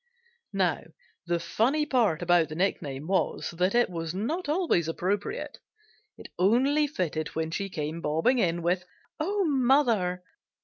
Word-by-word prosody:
Now, 185 Hz, -3 st, +1 dB, 0.5 s
the 170 Hz, 0 st, +1 dB
funny 245 Hz, -, +1 dB
part 220 Hz, -, +1 dB
about 175 Hz, -2 st, +3 dB
the 155 Hz, -, -6 dB
nickname 150 Hz, -6 st, -2 dB
was 190 Hz, +2 st, 0 dB
that 180 Hz, +5 st, 0 dB
it 240 Hz, 0 st, +4 dB
was 165 Hz, -1 st, -5 dB
not 290 Hz, -, -2 dB
always 305 Hz, -, +1 dB
appropriate; 190 Hz, +5 st, -3 dB, 0.6 s
it -, -, -11 dB
only 265 Hz, +10 st, +3 dB
fitted 165 Hz, -, -2 dB
when 160 Hz, 0 st, -2 dB
she 195 Hz, +4 st, -3 dB
came 155 Hz, -1 st, -4 dB
bobbing 165 Hz, +13 st, +2 dB
in 170 Hz, -4 st, 0 dB
with 180 Hz, +2 st, +1 dB, 0.4 s
"Oh, 390 Hz, +5 st, 0 dB
mother!" 245 Hz, -, +2 dB
185 Hz, 140 wpm, -27 LUFS, 165-255 Hz, 0.6 s, it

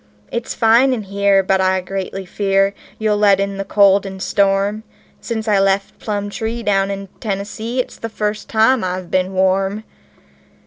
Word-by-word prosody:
It's 235 Hz, 0 st, -4 dB
fine 235 Hz, +4 st, +4 dB
in 225 Hz, -4 st, -3 dB
here, 200 Hz, 0 st, +2 dB
but 190 Hz, 0 st, +2 dB
I 190 Hz, 0 st, +2 dB
greatly 190 Hz, +1 st, -5 dB
fear 195 Hz, +1 st, +1 dB, 0.2 s
you'll 215 Hz, -1 st, +1 dB
let 200 Hz, -2 st, +4 dB
in 200 Hz, 0 st, -2 dB
the 195 Hz, -, -2 dB
cold 200 Hz, 0 st, +4 dB
and 190 Hz, -1 st, -7 dB
storm 200 Hz, +2 st, +1 dB, 0.4 s
Since 225 Hz, -2 st, -4 dB
I 205 Hz, -2 st, +3 dB
left 195 Hz, 0 st, 0 dB
Plumtree, 215 Hz, +3 st, -3 dB
down 195 Hz, -2 st, +1 dB
in 195 Hz, 0 st, -4 dB
Tennessee, 215 Hz, +4 st, -4 dB
it's 255 Hz, -, -3 dB
the 230 Hz, -, -5 dB
first 210 Hz, -1 st, -3 dB
time 225 Hz, +2 st, +3 dB
I've 185 Hz, -1 st, -4 dB
been 185 Hz, 0 st, +1 dB
warm." 190 Hz, +2 st, +1 dB
200 Hz, 165 wpm, -18 LUFS, 195-215 Hz, 0.4 s, fine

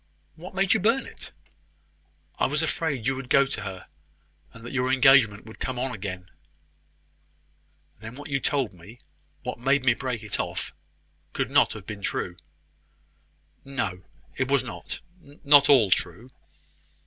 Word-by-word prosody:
"What 175 Hz, +5 st, -11 dB
made 195 Hz, 0 st, +3 dB
you 220 Hz, -, +2 dB
burn 230 Hz, +7 st, +2 dB
it?" -, -, -11 dB, 1.1 s
"I -, -, +3 dB
was 150 Hz, +4 st, 0 dB
afraid 150 Hz, -6 st, -1 dB
you 135 Hz, +1 st, +1 dB
would 130 Hz, -1 st, -7 dB
go 140 Hz, -1 st, +5 dB
to 135 Hz, -, -4 dB
her, 95 Hz, -2 st, -7 dB, 0.7 s
and 115 Hz, 0 st, -13 dB
that 120 Hz, -, -7 dB
your 130 Hz, -1 st, +1 dB
engagement 130 Hz, -6 st, +5 dB
would 110 Hz, -, -12 dB
come 130 Hz, -1 st, -3 dB
on 130 Hz, +1 st, -2 dB
again." 95 Hz, -3 st, -6 dB, 1.7 s
"Then 110 Hz, +3 st, -9 dB
what 145 Hz, +2 st, -9 dB
you 140 Hz, -2 st, 0 dB
told 135 Hz, -6 st, 0 dB
me 90 Hz, +7 st, -14 dB, 0.5 s
what -, -, -5 dB
made 135 Hz, +2 st, +2 dB
me 125 Hz, -, +6 dB
break 120 Hz, -3 st, -4 dB
it 105 Hz, -, -4 dB
off -, -, -3 dB, 0.6 s
could -, -, -2 dB
not -, -, +4 dB
have -, -, -10 dB
been 105 Hz, -1 st, -7 dB
true." 90 Hz, -2 st, -2 dB, 1.3 s
"No, 105 Hz, -10 st, -3 dB, 0.3 s
it 130 Hz, 0 st, -1 dB
was 140 Hz, -2 st, +3 dB
not 120 Hz, -4 st, -7 dB, 0.4 s
not 145 Hz, 0 st, +7 dB
all 120 Hz, -9 st, +6 dB
true." 100 Hz, +9 st, -1 dB
130 Hz, 155 wpm, -26 LUFS, 105-140 Hz, 1.7 s, not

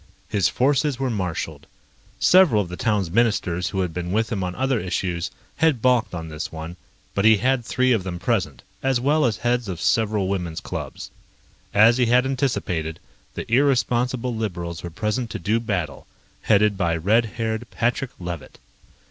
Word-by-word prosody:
His 100 Hz, -5 st, +2 dB
forces 140 Hz, +1 st, +1 dB
were 135 Hz, -1 st, -1 dB
marshaled. 85 Hz, -7 st, -4 dB, 0.5 s
Several 165 Hz, -, +5 dB
of 90 Hz, -, -10 dB
the 90 Hz, -, -5 dB
town's 100 Hz, -4 st, 0 dB
ministers 95 Hz, -5 st, +1 dB
who 95 Hz, -, -1 dB
had 90 Hz, -3 st, -2 dB
been 90 Hz, 0 st, -4 dB
with 110 Hz, +4 st, 0 dB
him 100 Hz, -4 st, -1 dB
on 90 Hz, 0 st, -3 dB
other 130 Hz, -2 st, +1 dB
issues 90 Hz, -2 st, -2 dB, 0.3 s
had 155 Hz, -4 st, +3 dB
balked 125 Hz, -5 st, +2 dB
on 80 Hz, -1 st, -5 dB
this 75 Hz, -1 st, -5 dB
one, 80 Hz, +1 st, -7 dB, 0.4 s
but 100 Hz, -, 0 dB
he 110 Hz, 0 st, +7 dB
had 130 Hz, +3 st, +1 dB
three 130 Hz, +2 st, +1 dB
of 115 Hz, -5 st, +3 dB
them 90 Hz, -2 st, -4 dB
present, 90 Hz, -, -1 dB, 0.2 s
as 135 Hz, -2 st, +1 dB
well 145 Hz, +4 st, +2 dB
as 110 Hz, -4 st, +1 dB
heads 120 Hz, +1 st, 0 dB
of 90 Hz, -3 st, -4 dB
several 105 Hz, 0 st, +1 dB
women's 90 Hz, -4 st, -2 dB
clubs. -, -, -6 dB, 0.6 s
As 115 Hz, +4 st, +5 dB
he 125 Hz, -, +3 dB
had 125 Hz, +2 st, +4 dB
anticipated, 90 Hz, -, -1 dB, 0.4 s
the -, -, -4 dB
irresponsible 125 Hz, -2 st, +2 dB
liberals 85 Hz, -6 st, -4 dB
were 85 Hz, -, -6 dB
present 105 Hz, +7 st, -2 dB
to -, -, -4 dB
do 110 Hz, +2 st, 0 dB
battle, 90 Hz, -10 st, -3 dB, 0.3 s
headed 105 Hz, -1 st, +3 dB
by 85 Hz, -3 st, +1 dB
red 110 Hz, +8 st, +3 dB
haired 115 Hz, +1 st, -2 dB
Patrick 120 Hz, +2 st, -1 dB
Levitt. 85 Hz, -4 st, -7 dB
110 Hz, 175 wpm, -23 LUFS, 90-125 Hz, 0.6 s, he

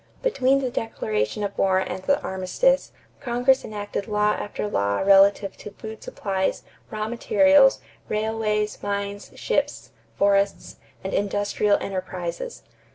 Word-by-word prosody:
Between 275 Hz, -, +2 dB
the 255 Hz, -2 st, -2 dB
declaration 110 Hz, -, -2 dB
of 200 Hz, -1 st, -3 dB
war 190 Hz, -1 st, +3 dB
and 190 Hz, 0 st, -2 dB
the 280 Hz, +9 st, +2 dB
armistice, 190 Hz, -, +1 dB, 0.3 s
Congress 250 Hz, 0 st, +2 dB
enacted 205 Hz, -1 st, -5 dB
law 210 Hz, -1 st, +2 dB
after 210 Hz, -, -4 dB
law 100 Hz, -, 0 dB
relative 195 Hz, 0 st, +5 dB
to -, -, -9 dB
food 220 Hz, +2 st, -10 dB
supplies, 190 Hz, -2 st, -2 dB, 0.3 s
raw 215 Hz, -1 st, -3 dB
materials, 275 Hz, +4 st, +4 dB, 0.3 s
railways, 215 Hz, -1 st, -1 dB
mines, 200 Hz, 0 st, -4 dB
ships, -, -, -2 dB, 0.3 s
forests, 200 Hz, 0 st, +1 dB, 0.3 s
and 190 Hz, -, -4 dB
industrial 205 Hz, +1 st, +1 dB
enterprises. 185 Hz, -, -5 dB
205 Hz, 120 wpm, -24 LUFS, 195-225 Hz, 0.3 s, relative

